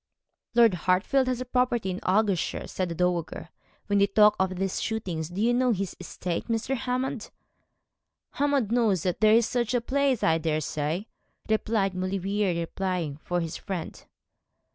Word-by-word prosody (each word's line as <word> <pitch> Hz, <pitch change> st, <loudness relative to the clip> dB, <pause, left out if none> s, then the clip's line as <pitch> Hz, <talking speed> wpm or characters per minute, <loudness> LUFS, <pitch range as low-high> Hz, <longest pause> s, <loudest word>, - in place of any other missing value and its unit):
'Lord 230 Hz, -4 st, +6 dB
Hartfield 185 Hz, -, +1 dB
has 255 Hz, 0 st, -1 dB
property 245 Hz, -5 st, 0 dB
in 185 Hz, -, -4 dB
Argyleshire,' 195 Hz, -2 st, 0 dB
said 185 Hz, -2 st, -3 dB
the 170 Hz, -, -4 dB
dowager, 175 Hz, -1 st, -1 dB, 0.4 s
when 205 Hz, -1 st, +1 dB
they 200 Hz, -, +4 dB
talked 210 Hz, 0 st, +4 dB
of 190 Hz, 0 st, 0 dB
these 190 Hz, +1 st, -2 dB
shootings. 175 Hz, -8 st, -3 dB
'Do 180 Hz, +2 st, -6 dB
you 235 Hz, +3 st, +3 dB
know 250 Hz, 0 st, +3 dB
his 195 Hz, -2 st, -3 dB
estate, 180 Hz, -1 st, -4 dB
Mr. 230 Hz, +3 st, -1 dB
Hammond?' 250 Hz, -1 st, -3 dB, 1.0 s
'Hammond 280 Hz, -6 st, 0 dB
knows 220 Hz, -8 st, +2 dB
that 180 Hz, +1 st, -2 dB
there 215 Hz, 0 st, +6 dB
is 230 Hz, 0 st, +4 dB
such 240 Hz, -1 st, -1 dB
a -, -, +3 dB
place, 270 Hz, 0 st, 0 dB
I 165 Hz, 0 st, +3 dB
daresay,' 155 Hz, +3 st, -2 dB, 0.4 s
replied 215 Hz, -3 st, +1 dB
Maulevrier, 185 Hz, 0 st, -1 dB
replying 170 Hz, -4 st, -3 dB
for 175 Hz, +3 st, -2 dB
his 165 Hz, -1 st, -4 dB
friend. 180 Hz, -4 st, -6 dB
195 Hz, 155 wpm, -27 LUFS, 180-235 Hz, 1.0 s, Lord